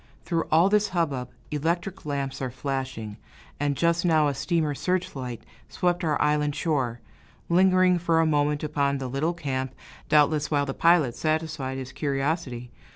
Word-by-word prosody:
Through 165 -2 0
all 165 +4 +5
this 210 +1 +3
hubbub, 145 -9 -1 0.2
electric 170 +4 -2
lamps 140 -2 -3
are 130 - -1
flashing, 130 -5 -4 0.4
and 145 -1 0
just 170 0 +2
now 160 -4 +4
a - - -1
steamer's 155 0 -1
search 180 -3 -1
light 125 -4 -6 0.3
swept 175 0 0
our 155 -3 +1
island 150 -1 +1
shore, 130 -8 -1 0.5
lingering 185 0 +4
for 165 -1 +2
a 165 - +4
moment 150 -1 +1
upon 140 -2 0
the 135 -1 -4
little 145 +7 -1
camp, 130 -5 -3 0.3
doubtless 150 0 +3
while 145 -2 +1
the 135 - -3
pilot 165 -8 +3
satisfied 155 -4 -2
his 130 -1 -6
curiosity. 135 -4 -2
150 Hz, 155 wpm, -26 LUFS, 135-165 Hz, 0.5 s, all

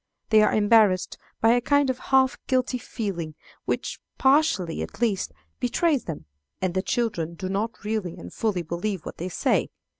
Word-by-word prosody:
They 215 -1 +7
are 215 - +4
embarrassed 210 -3 +3 0.2
by 225 - +5
a 245 +1 +3
kind 285 +1 +3
of 255 - -7
half 265 -1 +4
guilty 255 -1 +1
feeling, 175 -11 -4 0.3
which, - - -2 0.2
partially 265 - +3
at - - -7
least, 210 - 0 0.3
betrays 285 +3 +1
them, 160 -4 -6 0.3
and 185 -2 -1
the 185 - +1
children 185 -8 -1
do 185 +2 -5
not 215 +4 -2
really 210 -5 -2
and 90 +1 -10
fully 205 -6 -1
believe 175 +3 -3
what - - -7
they 180 +3 -4
say. 175 - +1
215 Hz, 170 wpm, -25 LUFS, 180-245 Hz, 0.3 s, They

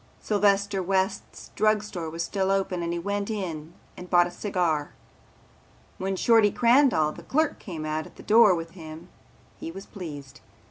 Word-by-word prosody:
Sylvester 200 -1 +1
West's 190 +2 -2
Drug 215 -1 +2
Store 175 -6 -5
was 165 +1 -4
still 190 +2 -1
open 195 -2 0
and 170 0 -2
he 170 - -2
went 200 +4 -3
in 170 -6 -5 0.2
and 180 - -10
bought 175 -1 +5
a 175 - -6
cigar. 175 -6 -1 1.1
When 195 +1 -2
Shorty 225 +1 +4
Crandall 235 - +3
the - - -11
clerk 310 +2 0
came 165 -5 -7
out 155 0 -3
at - - -18
the - - -13
door 215 -3 +6
with 165 0 -6
him 165 0 -11 0.5
he - - -6
was 195 +3 -9
pleased. 150 -8 -9
190 Hz, 170 wpm, -26 LUFS, 165-205 Hz, 1.1 s, door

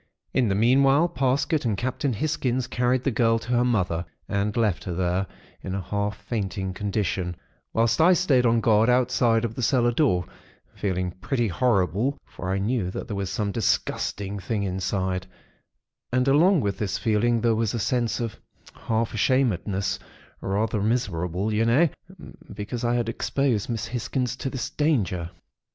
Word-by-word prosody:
In 130 -3 +2
the 95 - +1
meanwhile, 135 - +4
Parsket 140 0 0
and 110 -5 0
Captain 130 +4 -1
Hisgins 130 0 -1
carried 125 +1 0
the 135 - +1
girl 115 0 +3
to 115 +1 -8
her 120 0 +3
mother, 95 -9 0 0.2
and 100 +2 -1
left 110 -6 +1
her 90 - -3
there, 90 +2 0 0.3
in 95 - -4
a 100 - -2
half 105 +1 -2
fainting 95 -3 -3
condition; 95 -3 -2 0.4
whilst 115 +6 +2
I 180 +3 +7
stayed 150 -9 +3
on 115 -1 +3
guard 110 +1 +4
outside 125 -2 +3
of 115 - -4
the 130 - -5
cellar 120 -1 +3
door, 115 - +2 0.5
feeling 90 -2 -2
pretty 115 +6 -1
horrible, 110 - +1
for 95 - -7
I 95 - +1
knew 100 -1 0
that - - -5
there 105 - -4
was 100 -2 -2
some 105 -2 -1
disgusting 100 -2 -1
thing 105 +1 -2
inside; 95 0 -2 0.8
and 125 +1 +1
along 165 +5 +5
with 100 -3 -2
this 105 -3 -1
feeling 115 +2 +2
there 115 0 +3
was 110 +1 0
a - - -1
sense 120 +2 0
of 115 -3 -4 0.3
half 115 0 -2
ashamedness, 105 -5 +1 0.4
rather 105 +2 0
miserable 100 -3 -1
you 110 +2 +2
know, 130 +9 +4 0.6
because 105 +4 -5
I 120 0 +1
had 120 -2 0
exposed 120 -1 0
Miss 115 -3 -2
Hisgins 125 +1 -2
to 135 - -3
this 130 -2 -4
danger. 105 - 0
115 Hz, 165 wpm, -25 LUFS, 100-125 Hz, 0.8 s, I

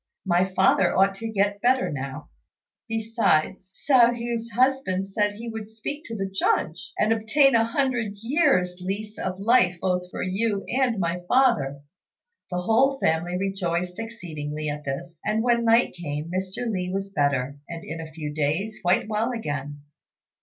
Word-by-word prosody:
My 180 0 +3
father 190 -1 +3
ought 195 +1 +4
to 225 +2 -4
get 205 -1 0
better 255 +1 +2
now. 135 +1 -6 0.6
Besides, 215 -5 0
Hsiao 245 -4 +4
hui's 235 -1 -3
husband 245 -5 +1
said 205 +1 0
he 225 +3 -8
would 220 -2 -6
speak 290 +8 -6
to 230 - -6
the 195 -2 -2
Judge, 190 -4 -1
and 215 +1 +3
obtain 270 +6 +3
a 230 -1 +5
hundred 235 -3 0
years' 210 - +1
lease 210 +3 -4
of 185 0 -3
life 195 -4 +4
both 180 -1 -1
for - - -4
you 200 +2 -1
and 255 -3 +1
my 175 0 -1
father." 230 - +2 0.7
The 180 -1 -2
whole 270 +8 +3
family 170 0 0
rejoiced 180 -2 -2
exceedingly 155 -10 -5
at 145 0 -5
this, 160 +4 -5
and, 215 +1 0
when 235 -1 +2
night 230 +1 +4
came, 155 -2 -5
Mr. 190 +6 -3
Li 185 -5 -2
was 195 +1 -3
better, 140 -3 0
and 170 -1 -6
in 165 +1 -6
a 160 -1 -9
few 150 -2 -5
days 155 +9 -1
quite 180 +2 +2
well 220 +3 0
again. 145 - -4
195 Hz, 160 wpm, -25 LUFS, 175-230 Hz, 0.7 s, a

